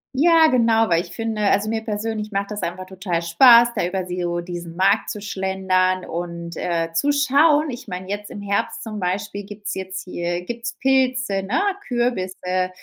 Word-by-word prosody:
Ja, 325 Hz, +3 st, +5 dB
genau, 225 Hz, -3 st, +3 dB
weil 170 Hz, 0 st, +3 dB
ich 175 Hz, -, -11 dB
finde 225 Hz, +1 st, -3 dB
also 205 Hz, +1 st, +2 dB
mir 225 Hz, 0 st, -1 dB
persönlich 215 Hz, 0 st, -3 dB
macht 200 Hz, +1 st, -2 dB
das 210 Hz, -, -4 dB
einfach 185 Hz, +2 st, -4 dB
total 185 Hz, -3 st, -3 dB
Spaß, 235 Hz, +8 st, +7 dB
da -, -, 0 dB
über 185 Hz, 0 st, -3 dB
so 175 Hz, -1 st, -2 dB
diesen 170 Hz, -1 st, -7 dB
Markt 195 Hz, +3 st, +2 dB
zu 210 Hz, -, -5 dB
schlendern 190 Hz, -2 st, 0 dB
und, 170 Hz, 0 st, -5 dB
äh, 165 Hz, -1 st, -2 dB
zu 285 Hz, +13 st, +2 dB
schauen. 290 Hz, +1 st, +3 dB
Ich 240 Hz, -, -8 dB
meine, 185 Hz, +1 st, -6 dB
jetzt 205 Hz, +1 st, -5 dB
im -, -, -8 dB
Herbst 200 Hz, 0 st, -2 dB
zum 215 Hz, -2 st, -6 dB
Beispiel 200 Hz, +3 st, -3 dB
gibt's 205 Hz, 0 st, -6 dB
jetzt 190 Hz, 0 st, -5 dB
hier 175 Hz, -1 st, -4 dB
gibt's 235 Hz, +2 st, -5 dB
Pilze, 260 Hz, -6 st, +1 dB
ne, 200 Hz, +7 st, -1 dB, 0.3 s
Kürbisse, 185 Hz, -6 st, -1 dB
200 Hz, 180 wpm, -22 LUFS, 180-225 Hz, 0.3 s, Spaß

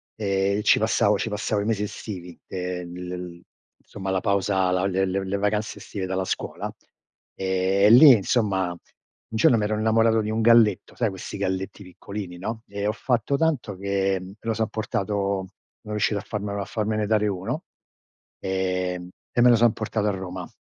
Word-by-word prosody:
e 100 Hz, -1 st, 0 dB
ci -, -, +5 dB
passavo -, -, +3 dB
ci -, -, -2 dB
passavo 105 Hz, 0 st, -1 dB
i -, -, -3 dB
mesi 110 Hz, -2 st, 0 dB
estivi, 90 Hz, -4 st, -7 dB
ehm, 90 Hz, -1 st, -5 dB, 0.4 s
insomma 95 Hz, 0 st, -5 dB
la 95 Hz, -, 0 dB
pausa, 100 Hz, -2 st, +1 dB
la 90 Hz, +1 st, +1 dB
le 95 Hz, 0 st, +1 dB
le 95 Hz, +1 st, -2 dB
le 100 Hz, +1 st, -1 dB
vacanze 105 Hz, +1 st, -1 dB
estive 95 Hz, -3 st, -5 dB
dalla 95 Hz, 0 st, -1 dB
scuola, -, -, -4 dB, 0.6 s
ehm, 95 Hz, +1 st, +1 dB
e 105 Hz, -, +7 dB
lì 130 Hz, +4 st, +10 dB
insomma 100 Hz, -4 st, +1 dB
un 85 Hz, -, -7 dB, 0.6 s
giorno 115 Hz, +1 st, +5 dB
mi 105 Hz, -, 0 dB
ero 105 Hz, +1 st, 0 dB
innamorato 110 Hz, 0 st, +3 dB
di 105 Hz, -, -3 dB
un 110 Hz, +1 st, 0 dB
galletto, 115 Hz, -4 st, +4 dB
sai 115 Hz, -3 st, +1 dB
questi 95 Hz, +1 st, -7 dB
galletti 95 Hz, +1 st, -3 dB
piccolini, 90 Hz, 0 st, -8 dB
no, 110 Hz, +5 st, -5 dB
e 100 Hz, 0 st, -4 dB
ho -, -, +2 dB
fatto 125 Hz, +4 st, 0 dB
tanto 140 Hz, -11 st, 0 dB
che 95 Hz, 0 st, 0 dB
me 95 Hz, +2 st, -10 dB
lo 115 Hz, 0 st, -1 dB
son 110 Hz, 0 st, -1 dB
portato, 100 Hz, -2 st, -2 dB, 0.3 s
sono 105 Hz, -, -7 dB
riuscito 105 Hz, 0 st, +1 dB
a -, -, -6 dB
farmelo 100 Hz, -1 st, -4 dB
a -, -, -4 dB
farmene 110 Hz, -1 st, -1 dB
dare 105 Hz, -1 st, +2 dB
uno, 105 Hz, -, -3 dB, 0.8 s
ehm, 90 Hz, -1 st, -2 dB, 0.2 s
e -, -, 0 dB
me 125 Hz, -, +7 dB
lo 120 Hz, -, +7 dB
son 115 Hz, 0 st, +5 dB
portato 110 Hz, -1 st, -2 dB
a -, -, +3 dB
Roma. 95 Hz, -2 st, -6 dB
100 Hz, 180 wpm, -24 LUFS, 95-110 Hz, 0.8 s, lì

